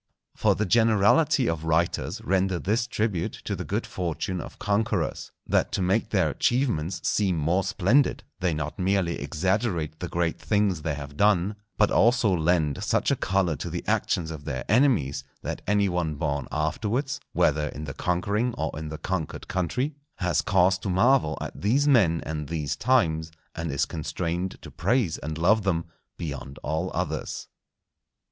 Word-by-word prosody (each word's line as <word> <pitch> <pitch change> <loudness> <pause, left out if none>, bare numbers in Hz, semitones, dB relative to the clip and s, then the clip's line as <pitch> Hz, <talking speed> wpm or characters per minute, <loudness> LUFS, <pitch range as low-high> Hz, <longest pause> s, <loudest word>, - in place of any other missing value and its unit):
For - - +3
the 110 - 0
generality 115 - +4
of 80 -1 -1
writers 80 +2 0
render 95 0 +1
this 110 +7 0
tribute 105 -7 -1
to - - -1
the - - -4
good - - -2
fortune 90 +1 -3
of - - -10
conquerors, 105 -3 -1
that - - +1
to - - 0
make 95 +5 +1
their 95 -7 +2
achievements 95 - 0
seem 95 -5 +1
more 85 +5 +1
splendid, 125 +13 +2 0.2
they 90 -1 +1
not 75 +3 -4
merely 95 -2 +1
exaggerate 85 +1 -1
the 90 - -3
great 85 -1 -1
things 100 -6 +1
they 75 -1 -2
have 70 0 -8
done, 100 0 +3 0.2
but 105 - +4
also 115 -3 +4
lend 80 -4 +1
such - - +1
a - - +3
colour 95 -4 +1
to - - -5
the - - -4
actions 80 -2 0
of 75 -3 -8
their 65 - -4
enemies, 100 - +2 0.2
that - - -4
any 100 0 +3
one 85 -4 -1
born 70 -2 -2
afterwards, 115 - -1
whether 75 0 +2
in 75 +1 -6
the 70 -3 -5
conquering 100 +9 0
or 80 -1 -2
in 80 -1 -5
the 80 - -5
conquered 80 0 -4
country, 110 - -1 0.2
has 90 -2 +1
cause 95 +1 +3
to 95 - -4
marvel 95 - +3
at - - -6
these 130 +9 +2
men 95 - +4
and 75 -2 -4
these 75 -3 -2
times, 85 -10 +2 0.2
and 80 -2 -3
is 70 +1 +1
constrained 85 +3 -3
to - - -9
praise 120 -9 0
and 80 +2 -5
love 105 +7 +4
them 85 -4 0 0.3
beyond 70 -4 -6
all 80 +5 -1
others. 80 -3 -3
90 Hz, 165 wpm, -26 LUFS, 80-105 Hz, 0.3 s, generality